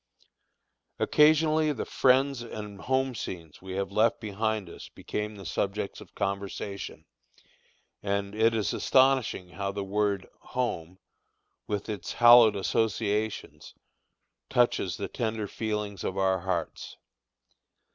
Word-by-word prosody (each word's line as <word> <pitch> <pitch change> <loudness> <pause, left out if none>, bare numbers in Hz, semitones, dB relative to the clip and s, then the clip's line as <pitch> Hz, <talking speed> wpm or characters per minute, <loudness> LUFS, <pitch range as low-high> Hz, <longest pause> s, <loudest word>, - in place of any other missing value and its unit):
Occasionally 155 0 +4
the - - -4
friends 135 0 +3
and 105 -3 -8
home 130 0 0
scenes 85 -8 -7
we 95 0 -7
have 100 +1 -2
left 110 +3 +2
behind 110 -1 -2
us - - -10
became 105 0 -5
the 100 -2 -10
subjects 100 +4 -2
of - - -15
conversation, 100 -1 -4 1.0
and 100 0 -2
it 115 +1 +3
is 105 -6 0
astonishing 130 -8 +2
how 100 +2 -3
that 100 0 -3
word 100 -1 -1
"home," 95 -9 -3 0.7
with 105 -1 -3
its 105 -4 -5
hallowed 120 -3 +8
associations, 110 +1 -1 0.7
touches 120 -1 +2
the - - -3
tender 110 -2 -3
feelings 105 -3 -3
of 95 - -3
our 95 -1 +2
hearts. 95 -1 -4
105 Hz, 115 wpm, -28 LUFS, 100-115 Hz, 1.0 s, hallowed